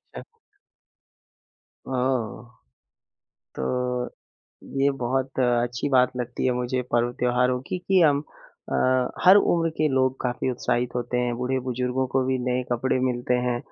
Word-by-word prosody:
अच्छा। - - -7 1.7
ओह! 125 -4 -1 1.1
तो 125 - -1 0.7
ये 140 +1 +4
बहुत 130 +2 -2
अच्छी 120 +1 +1
बात 130 -1 +4
लगती 125 0 -3
है 130 - +3
मुझे 125 +1 -1
पर्व-त्योहारों 125 +1 +1
की 185 - -2
कि 190 -1 +4
हम 145 -4 +4 0.5
अ, - - -1 0.5
हर 185 +2 +8
उम्र 165 -4 +2
के 155 0 +3
लोग 130 0 +2
काफ़ी 125 +1 -1
उत्साहित 120 0 -1
होते 125 0 -2
हैं। 120 -1 0
बूढ़े-बुज़ुर्गों 130 0 -1
को 130 +1 +1
भी 130 0 +1
नए 125 0 0
कपड़े 130 +2 +1
मिलते 125 -1 0
हैं, 120 -1 0
125 Hz, 130 wpm, -25 LUFS, 125-130 Hz, 1.7 s, हर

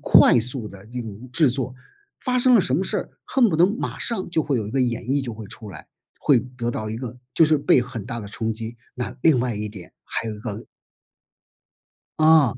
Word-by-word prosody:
快 120 - +6
速 125 -1 +1
的 100 0 -12
一 125 +2 -5
种 110 +3 -9
制 155 -1 +5
作， 130 0 -2 0.4
发 250 -1 -1
生 250 -1 +6
了 - - +6
什 130 - 0
么 180 - +1
事 - - -1
儿， - - -4
恨 250 -4 +3
不 160 - 0
得 170 - +6
马 210 +6 -2
上 230 -7 -1
就 160 -3 +2
会 140 -3 0
有 110 -3 -2
一 105 - -7
个 135 - +1
演 120 -1 -1
绎 135 +2 0
就 120 -3 -4
会 110 -1 -8
出 105 0 -10
来， 75 - -11 0.3
会 130 -5 +4
得 125 -2 -5
到 110 -1 -4
一 110 - -4
个 125 0 -6 0.2
就 160 - +5
是 155 0 +4
被 135 - +4
很 120 -4 -5
大 120 -2 -5
的 105 - -7
冲 110 +1 -2
击， 115 +1 -6 0.2
那 125 - -4
另 155 -6 +5
外 120 -2 0
一 105 +1 -3
点 95 -4 -11
还 115 - -3
有 110 - -4
一 105 - -10
个 105 0 -6 1.5
嗯。 155 -6 +5
125 Hz, 255 characters per minute, -23 LUFS, 110-145 Hz, 1.5 s, 快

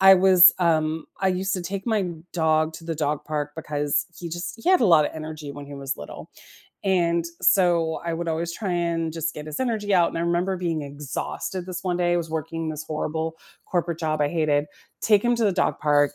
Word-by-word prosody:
I 195 0 +9
was, 185 -1 +8
um 160 -2 +1
I 190 - +3
used 190 +1 -1
to 180 - -3
take 195 +5 -5
my 220 -3 +2 0.3
dog 160 -1 +2
to 165 - -10
the 165 -1 -3
dog 150 -1 -1
park 150 -2 -3
because 145 -2 -1
he 170 - -6
just 175 +7 -5
he - - -1
had 370 -7 +5
a - - +4
lotta 160 -6 +4
energy 155 -2 -7
when 145 0 -8
he 145 - -10
was 140 0 -4
little, 75 - -9 0.6
and 170 -3 +2 0.2
so, 170 -4 +3
I 170 -1 -1
would 170 0 -3
always 165 +1 -2
try 195 0 -4
and 170 -2 -1
just 165 0 -3
get 150 0 -7
his 150 - -5
energy 220 -5 -1
out, 175 -2 +5
and - - -7
I - - -1
remember 175 +2 0
being 170 -3 -2
exhausted 145 +5 -5
this 180 0 -5
one 180 -2 -1
day- 175 -1 +1
I - - +3
was 165 -2 -3
working 160 +1 -3
this 155 0 -5
horrible 160 +1 -3 0.3
corporate 170 -2 -1
job 155 -2 -1
I 145 - +3
hated- 150 -3 +1 0.4
take 210 -2 +4
him 240 0 +3
to 230 - +1
the 200 - +3
dog 180 - 0
park, 145 -1 +3
165 Hz, 225 wpm, -24 LUFS, 155-180 Hz, 0.6 s, I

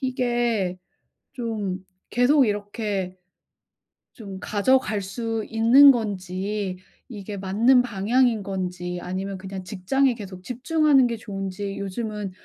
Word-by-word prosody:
이게 240 -7 0 0.6
좀 215 -7 -3 0.3
계속 260 +3 +4
이렇게 205 -3 -3 1.0
좀 200 -5 -9
가져갈 215 -1 +1
수 225 +3 -3
있는 235 +6 +7
건지 195 -3 -3 0.3
이게 205 -1 -7
맞는 220 +7 +3
방향인 235 +1 +1
건지 180 -2 -4
아니면 190 +2 -4
그냥 190 0 -7
직장에 235 +9 +1
계속 190 -5 -9
집중하는 275 - +3
게 235 - -3
좋은지 195 -2 -5
요즘은 210 +1 -4
205 Hz, 225 characters per minute, -24 LUFS, 190-240 Hz, 1.0 s, 있는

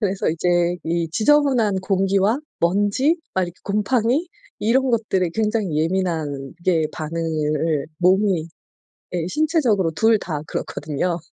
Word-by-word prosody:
그래서 200 -3 0
이제 175 +1 +1
이 170 0 -1
지저분한 245 - +3
공기와 195 +4 +1 0.2
먼지 205 - +2 0.2
막 190 - +2
이렇게 175 0 -5
곰팡이 235 - +1 0.3
이런 255 +5 +2
것들에 205 -6 0
굉장히 215 -7 0
예민하게 160 -1 -1
반응을 155 -1 -1
몸이 185 -2 +2 0.7
예. 170 -2 -1
신체적으로 250 - +1
2 220 +7 +3
다 155 -6 -4
그렇거든요. 155 +5 -3
185 Hz, 270 characters per minute, -21 LUFS, 165-220 Hz, 0.7 s, 지저분한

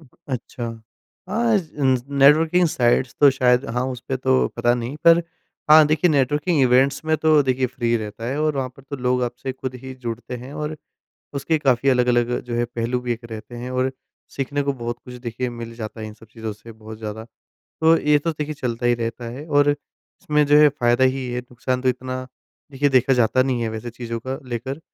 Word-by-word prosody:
अच्छा। 125 -3 -7 0.6
हाँ, 225 +2 +2
ज 160 -4 -8
इन 130 -2 +4
ज 120 - -9 0.2
नेटवर्किंग 160 +5 +5
साइट्स 125 -1 +1
तो 145 - +8
शायद 125 -1 +2
हाँ, 125 +1 0
उसपे 130 +1 -4
तो 130 0 +2
पता 120 0 +2
नहीं, 120 +4 -4
पर 170 0 +7 0.5
हाँ, 155 -1 +9
देखिए 155 +4 +2
नेटवर्किंग 145 +3 +2
इवेंट्स 130 +4 +3
में 160 0 +2
तो 155 -1 +4
देखिए 130 -1 +1
फ्री 120 - -1
ही 120 - +3
रहता 110 +1 -6
है 135 +4 -2
और 155 -2 +1
वहाँ 130 -1 -1
पर 135 - -15
तो 140 - -3
लोग 125 0 +2
आपसे 125 +2 -3
ख़ुद 130 0 -6
ही 130 - -7
जुड़ते 120 +1 -5
हैं। 125 +3 -10
और 150 +1 -4 0.6
उसके 150 +3 0
काफ़ी 135 -2 +2
अलग-अलग 125 -1 +2
जो 120 -1 -5
है 120 0 +1
पहलू 120 +1 -2
भी 125 -1 -2
एक 115 +1 -7
रहते 110 +2 -8
हैं 125 +2 -6
और 130 +1 0 0.4
सीखने 140 +1 -1
को 140 0 0
बहुत 120 -2 -5
कुछ 125 - -10
देखिए 125 0 -4
मिल 115 -1 -8
जाता 110 -1 -7
है 110 - -5
इन 105 - -9
सब 110 - -17
चीज़ों 110 -1 -5
से 115 +2 -13
बहुत 110 0 -11
ज़्यादा, 110 0 -6 0.6
तो 160 +1 +6
ये 150 0 +3
तो 165 +3 -2
देखिए 155 0 -4
चलता 120 -3 -3
ही 120 - +4
रहता 115 0 -4
है। 140 +6 -8
और 145 -1 +4
इसमें 150 +1 -2
जो 145 +1 +6
है 150 - +8
फायदा 120 -2 +2
ही 130 0 0
है, 125 - -2
नुकसान 125 +1 -3
तो 130 - +2
इतना 130 0 -3 0.5
देखिए 145 +2 +2
देखा 130 0 +3
जाता 125 +1 +3
नहीं 130 -3 -1
है 115 - -1
वैसे 110 +2 -5
चीज़ों 115 0 -5
का 135 +1 -3
लेकर, 130 +5 -4
130 Hz, 215 wpm, -22 LUFS, 120-145 Hz, 0.6 s, हाँ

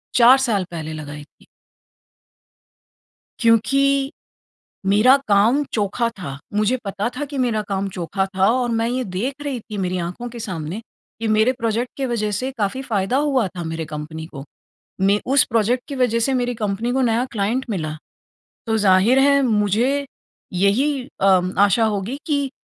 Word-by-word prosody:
4 250 +2 +7
साल 225 -7 +1
पहले 160 -2 -5
लगाई 150 -1 -7
थी। 150 - -24 1.9
क्योंकि, 275 +4 +3 0.8
मेरा 215 +7 +6
काम 215 +8 +4
चोखा 215 +3 0
था, 140 -7 -6 0.2
मुझे 215 +4 +2
पता 200 +2 -2
था 290 - -2
कि 280 - -4
मेरा 235 -4 +1
काम 195 0 -1
चोखा 190 +2 -1
था 190 0 +4
और 250 0 0
मैं 230 0 0
ये 255 +1 -1
देख 200 +8 -3
रही 275 -4 -3
थी, 215 -1 -8
मेरी 185 -1 -1
आँखों 180 +8 -5
के 240 0 -9
सामने 180 -2 -5 0.4
कि 225 - -1
मेरे 220 +3 +3
प्रोजेक्ट 235 -1 -2
के 270 - -2
वजह 225 -4 -1
से 255 +6 -2
काफ़ी 210 +5 -1
फायदा 220 -1 -1
हुआ 275 -5 +2
था 175 - -4
मेरे 160 0 -4
कंपनी 155 +1 -7
को। 140 -4 -9 0.6
मैं 200 +2 +3
उस 280 - +6
प्रोजेक्ट 235 +2 +1
की 280 - -5
वजह 245 -3 +1
से 265 +4 +1
मेरी 245 -1 0
कंपनी 215 +2 -2
को 265 +1 +1
नया 240 0 +1
क्लाइंट 225 +5 -1
मिला। 160 -7 -2 0.7
तो, 225 0 +1
ज़ाहिर 205 +5 +4
है 280 +1 +4
मुझे 235 +5 +1 0.5
यही 250 +10 +1 0.2
अम 185 -1 +3
आशा 205 +3 +4
होगी 215 +4 -2
कि 285 -3 0
220 Hz, 165 wpm, -21 LUFS, 195-255 Hz, 1.9 s, 4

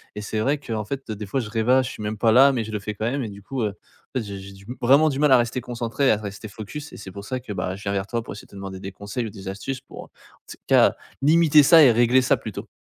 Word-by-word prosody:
et 105 - -5
c'est 110 +1 -3
vrai 140 +6 +1
qu'en 110 -6 -4
fait 135 +3 -6
des 105 0 -5
fois 135 - -1
je 110 - -7
rêvasse, 120 +4 +2
je - - -6
suis 105 - -8
même 105 +1 -3
pas 110 +1 +3
là 135 +4 +7
mais 120 -3 -1
je 110 - -7
le 105 - -1
fais 105 +1 -5
quand 110 +2 -1
même 135 +1 -2
et 110 - -4
du 100 0 -11
coup, 135 +4 -4
heu, 105 - +1
en 105 +5 -9
fait 115 - -5
j'ai 100 -1 -7
j'ai 95 +1 -10
du 95 0 -16
m 125 - -5
vraiment 140 +6 +5
du 135 -2 -3
mal 150 -1 +4
à 130 - +8
rester 120 +1 -1
concentré, 120 +3 0
à 110 - +2
rester 105 0 -7
focus 115 +9 -8
et - - -9
c'est 95 - -9
pour 100 +2 -9
ça 130 +4 -3
que, 115 -4 -7
bah, 95 -1 -3
je 100 - -12
viens 100 - -2
vers 100 0 -2
toi 115 +1 -2
pour - - -8
essayer 100 - -11
de - - -27
te - - -14
demander 95 -1 -7
des 95 - -6
conseils 100 +5 -5
ou - - -5
des 95 0 -10
astuces 125 +7 -5
pour, - - -11
en - - -24 0.4
tout - - -9
cas, - - +5 0.3
limiter 155 0 +5
ça 165 +3 +8
et 130 - +7
régler 120 +3 +4
ça 130 - +3
plutôt. - - -7
115 Hz, 325 wpm, -23 LUFS, 100-130 Hz, 0.4 s, à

